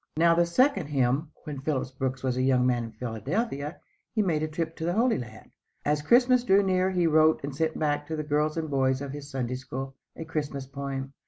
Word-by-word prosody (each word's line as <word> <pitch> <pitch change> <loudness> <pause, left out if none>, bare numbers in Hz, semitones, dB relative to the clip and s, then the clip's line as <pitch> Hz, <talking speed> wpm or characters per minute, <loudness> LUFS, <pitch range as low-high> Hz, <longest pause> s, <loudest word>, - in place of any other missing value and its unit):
Now 170 +1 +5
the 170 0 +3
second 195 - +2
"hymn." 135 +1 +1 0.2
When 145 -3 -6
Phillips 135 -3 -1
Brooks 135 0 -3
was 130 -2 0
a 130 - 0
young 130 -1 +3
man 120 -2 +1
in 115 - -9
Philadelphia 140 - -3 0.4
he 215 - +3
made 160 -5 0
a 155 - 0
trip 160 +1 -3
to - - -5
the 175 - +1
Holy 230 +3 +2
Land. 110 -3 -10 0.3
As 150 0 +1
Christmas 245 - +4
drew 200 -3 +4
near 185 -1 +2
he 180 -2 +1
wrote 155 -1 +4
and 140 -1 -4
sent 160 +1 -1
back 145 -1 0
to 160 - -3
the 155 - -3
girls 150 +1 0
and 160 -1 -1
boys 130 -1 +2
of 140 -1 -5
his 145 0 -8
Sunday 125 -3 -2
School, 130 +1 -6 0.2
a 160 - -7
Christmas 145 -4 -3
poem. 135 0 -5
150 Hz, 225 wpm, -27 LUFS, 135-165 Hz, 0.4 s, Now